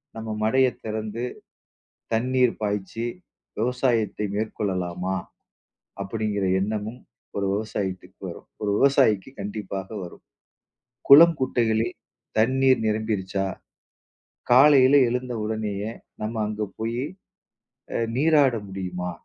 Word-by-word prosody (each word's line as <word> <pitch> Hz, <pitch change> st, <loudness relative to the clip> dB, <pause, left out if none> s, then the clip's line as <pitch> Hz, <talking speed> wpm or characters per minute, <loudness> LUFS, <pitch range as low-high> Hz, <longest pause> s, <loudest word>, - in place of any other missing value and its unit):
நம்ம 110 Hz, 0 st, -6 dB
மடையை 130 Hz, +3 st, +3 dB
திறந்து 110 Hz, +1 st, -4 dB, 0.9 s
தண்ணீர் 125 Hz, +2 st, +2 dB
பாய்ச்சி, 105 Hz, +2 st, -2 dB, 0.6 s
விவசாயத்தை 115 Hz, -4 st, 0 dB
மேற்கொள்ளலாமா? 95 Hz, -4 st, -2 dB, 0.9 s
அப்படிங்கிற 105 Hz, 0 st, -2 dB, 0.2 s
எண்ணமும் 110 Hz, +3 st, -3 dB, 0.4 s
ஒரு 100 Hz, -1 st, 0 dB
விவசாயத்துக்கு 95 Hz, -3 st, -4 dB
வரும். 85 Hz, -, -10 dB
ஒரு 105 Hz, -, 0 dB
விவசாயிக்கு 135 Hz, -5 st, +3 dB
கண்டிப்பாக 100 Hz, -2 st, -5 dB, 0.2 s
வரும். 85 Hz, -, -12 dB, 0.8 s
குளம் 165 Hz, +3 st, +9 dB
குட்டைகளில் 115 Hz, -3 st, +1 dB, 0.4 s
தண்ணீர் 130 Hz, +2 st, +4 dB
நிரம்பிருச்சா? 105 Hz, -3 st, -1 dB, 1.1 s
காலையில 135 Hz, +1 st, +7 dB
எழுந்த 125 Hz, 0 st, -2 dB
உடனேயே 105 Hz, -1 st, -3 dB, 0.3 s
நம்ம 110 Hz, +2 st, -3 dB
அங்க 105 Hz, 0 st, -4 dB, 0.2 s
போயி 115 Hz, +3 st, -2 dB, 0.9 s
அ -, -, +2 dB, 0.2 s
நீராட 145 Hz, -3 st, +4 dB
முடியுமா? 90 Hz, -2 st, -4 dB
110 Hz, 90 wpm, -25 LUFS, 100-125 Hz, 1.1 s, குளம்